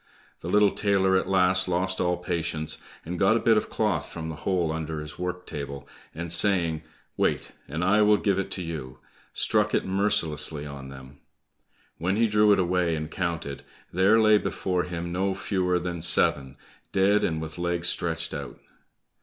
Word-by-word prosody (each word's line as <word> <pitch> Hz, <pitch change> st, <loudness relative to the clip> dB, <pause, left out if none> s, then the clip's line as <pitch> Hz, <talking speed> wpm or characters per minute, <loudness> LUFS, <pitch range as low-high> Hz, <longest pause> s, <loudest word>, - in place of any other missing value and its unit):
The -, -, -8 dB
little 105 Hz, +1 st, +4 dB
tailor 100 Hz, -2 st, +2 dB
at 95 Hz, -, +1 dB
last 95 Hz, -1 st, +3 dB
lost 95 Hz, +1 st, 0 dB
all 90 Hz, 0 st, +1 dB
patience, 80 Hz, -3 st, -2 dB, 0.2 s
and 85 Hz, +1 st, -5 dB
got 110 Hz, +4 st, +4 dB
a -, -, 0 dB
bit 115 Hz, -1 st, +4 dB
of 105 Hz, -, 0 dB
cloth 105 Hz, -8 st, -1 dB
from 80 Hz, -1 st, -6 dB
the 80 Hz, -, -5 dB
hole 90 Hz, -4 st, 0 dB
under 80 Hz, -1 st, -4 dB
his 75 Hz, 0 st, -8 dB
work 90 Hz, 0 st, -4 dB
table, 70 Hz, -1 st, -7 dB, 0.3 s
and 85 Hz, +1 st, +1 dB
saying, 85 Hz, -4 st, +2 dB, 0.4 s
"Wait, -, -, 0 dB, 0.2 s
and 80 Hz, +5 st, -3 dB
I 105 Hz, +4 st, +4 dB
will 105 Hz, 0 st, +5 dB
give 100 Hz, -2 st, 0 dB
it 95 Hz, -, -3 dB
to 95 Hz, -, -4 dB
you," 75 Hz, -6 st, -6 dB, 0.3 s
struck -, -, +1 dB
it -, -, 0 dB
mercilessly 80 Hz, -6 st, 0 dB
on 70 Hz, -2 st, -8 dB
them. 65 Hz, +1 st, -12 dB, 0.8 s
When 90 Hz, +4 st, 0 dB
he 115 Hz, +2 st, +3 dB
drew 105 Hz, 0 st, +4 dB
it 100 Hz, -, +5 dB
away 90 Hz, -2 st, +1 dB
and 75 Hz, 0 st, -5 dB
counted, 85 Hz, -6 st, -3 dB, 0.3 s
there 95 Hz, +5 st, +4 dB
lay 110 Hz, -1 st, +5 dB
before 90 Hz, -3 st, -2 dB
him 85 Hz, -1 st, -5 dB
no 95 Hz, +2 st, -1 dB
fewer 90 Hz, -2 st, 0 dB
than 85 Hz, -1 st, -4 dB
seven, 70 Hz, -5 st, +2 dB, 0.3 s
dead 100 Hz, +2 st, +3 dB
and 80 Hz, -2 st, 0 dB
with 80 Hz, +1 st, -7 dB
legs 85 Hz, 0 st, -1 dB
stretched 85 Hz, -2 st, -1 dB
out. -, -, -7 dB
90 Hz, 180 wpm, -26 LUFS, 80-95 Hz, 0.8 s, will